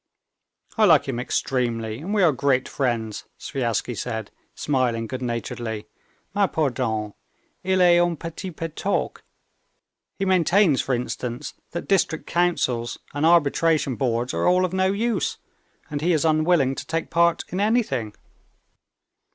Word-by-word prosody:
"I 215 - +7
like 160 -8 +5
him 125 -3 -2
extremely, 120 -3 -1
and 175 +7 -6
we 210 -2 +3
are 170 - +6
great 130 -1 +1
friends," 115 -5 -2
Sviazhsky 120 -3 -2
said, 110 0 -4 0.2
smiling 125 -5 0
good 130 +2 -5
naturedly. 115 -2 -4 0.5
"Mais 200 -2 +2
pardon, 120 -8 -1 0.5
il 190 0 +2
est 175 -1 +6
un 175 -1 +2
petit 165 +5 -6
peu 165 -1 -5
toqué; 180 +5 -2 1.0
he 195 - -1
maintains, 185 -3 +3
for 130 - 0
instance, 120 0 -4 0.2
that 170 - -6
district 185 -5 +1
councils 145 -9 0 0.2
and 145 +3 +1
arbitration 160 -3 +3
boards 120 -1 -1
are - - 0
all 180 +1 +4
of 185 - -4
no 190 0 +2
use, 220 0 -1 0.5
and 145 -1 -3
he 175 +3 +2
is 160 0 +1
unwilling 155 -3 +3
to - - -6
take 165 0 -3
part 170 0 +3
in 185 - -3
anything." 205 - 0
150 Hz, 145 wpm, -24 LUFS, 120-175 Hz, 1.0 s, I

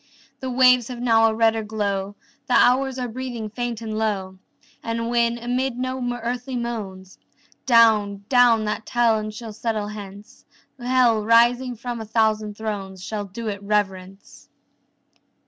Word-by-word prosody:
The 260 - -4
waves 250 -1 +4
have 250 -2 -7
now 225 -2 +4
a 220 - -3
redder 225 0 +2
glow; 205 -2 -3 0.3
The 250 - +2
hours 265 +1 +3
are 250 -1 -2
breathing 240 -3 -6
faint 240 0 -4
and 220 -1 -5
low. 190 -4 -2 0.4
And 230 0 -3
when, 235 0 +1
amid 245 +1 -2
no 255 +1 -3
earthly 245 +2 -4
moans, 205 -6 -6 0.5
Down, 215 -4 +4
down 245 -4 +4
that 210 +1 -3
town 225 -3 +1
shall 220 +1 -8
settle 215 -1 -3
hence, 205 -1 -11 0.4
Hell, 245 -3 +2
rising 240 +3 +3
from 235 0 -5
a - - -6
thousand 215 -1 0
thrones, 195 -4 -5
Shall 210 0 -4
do 220 +4 -7
it 200 -2 -4
reverence. 195 -2 -3
225 Hz, 145 wpm, -23 LUFS, 210-245 Hz, 0.5 s, waves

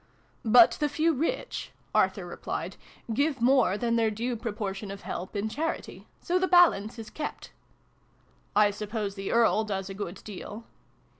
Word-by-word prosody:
" - - -37 0.2
But 230 - +7
the 295 -1 +1
few 315 +3 +2
rich," 325 - -2 0.2
Arthur - - +2
replied, - - -5 0.2
" 230 - -7
give 280 +3 +1
more 240 -5 +4
than 235 +1 0
their 225 -1 +3
due 235 +3 -2
proportion 210 -3 -4
of 200 0 -7
help 185 +4 -5
in 205 +1 -1
charity. 315 +9 -4
So 360 +1 +1
the 375 - +1
balance 320 - +4
is 225 -1 -8
kept." 305 - -6 0.5
" - - -36
I 205 - +2
suppose 210 0 -4
the 195 -1 -4
Earl 230 -1 +4
does 195 -2 -4
a - - -5
good 195 -2 -6
deal 210 +2 -8
225 Hz, 170 wpm, -28 LUFS, 205-275 Hz, 0.5 s, But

